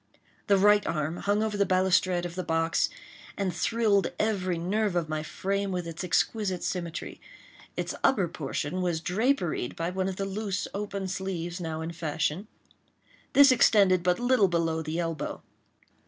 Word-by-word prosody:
The 200 -2 +5
right 205 +1 +5
arm 155 +2 -2
hung 205 +2 +1
over 215 -1 -1
the 200 - +3
balustrade 185 -1 +2
of 175 - -5
the 185 - -3
box, 165 0 +1 0.5
and 195 -3 -1
thrilled 210 +2 +2
every 190 -5 0
nerve 195 +3 0
of 170 -2 0
my 155 0 -2
frame 195 +5 -2
with 180 -2 -2
its 165 +2 -6
exquisite 185 +1 0
symmetry. 170 -2 -4 0.6
Its - - -2
upper 200 -9 +3
portion 155 +3 -3
was 175 -3 0
draperied 185 - 0
by 165 +1 -2
one 190 +1 -1
of 190 - -4
the 195 - -3
loose 195 0 -3
open 200 -1 -3
sleeves 180 -2 -4
now 160 -1 -4
in 160 +1 -4
fashion. 160 +3 -2 0.9
This 280 -1 +8
extended 200 -7 +5
but 180 +3 +1
little 245 -4 +4
below 165 -2 0
the 160 +1 -4
elbow. 165 -3 -3
185 Hz, 160 wpm, -28 LUFS, 165-200 Hz, 0.9 s, This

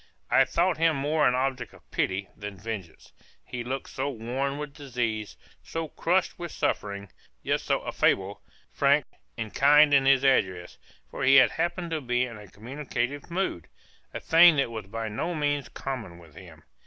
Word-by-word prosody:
I - - +6
thought 175 -1 +1
him 165 -1 +3
more 150 +2 +2
an 125 - +2
object 130 0 -2
of - - -22
pity 95 +1 -1
than 100 -1 -8
vengeance; 100 -4 -8 0.3
he 125 -1 -5
looked 130 +3 -5
so 135 +1 -2
worn 135 +3 -3
with 150 -1 -6
disease, 120 -7 -3 0.2
so 165 -1 -5
crushed 180 +5 0
with 170 -2 -5
suffering, 100 -1 -2 0.3
yet - - 0
so - - -1
affable, 95 +1 +1 0.3
frank, - - +3 0.3
and 110 - -5
kind 145 +1 +6
in 135 -1 +5
his 135 -1 +5
address; 95 -10 +1 0.3
for - - -7
he 135 - +6
happened 170 +6 +3
to 160 -2 -1
be 125 -1 0
in 115 -4 -9
a 105 - -12
communicative 130 - -4
mood, 170 - -2 0.4
a - - -5
thing 165 0 +6
that 135 -4 0
was 110 -4 -6
by 115 +2 -4
no 135 +12 -3
means 145 -2 -1
common 125 -10 -6
with 85 -3 -16
him. - - -14
130 Hz, 170 wpm, -27 LUFS, 110-150 Hz, 0.4 s, I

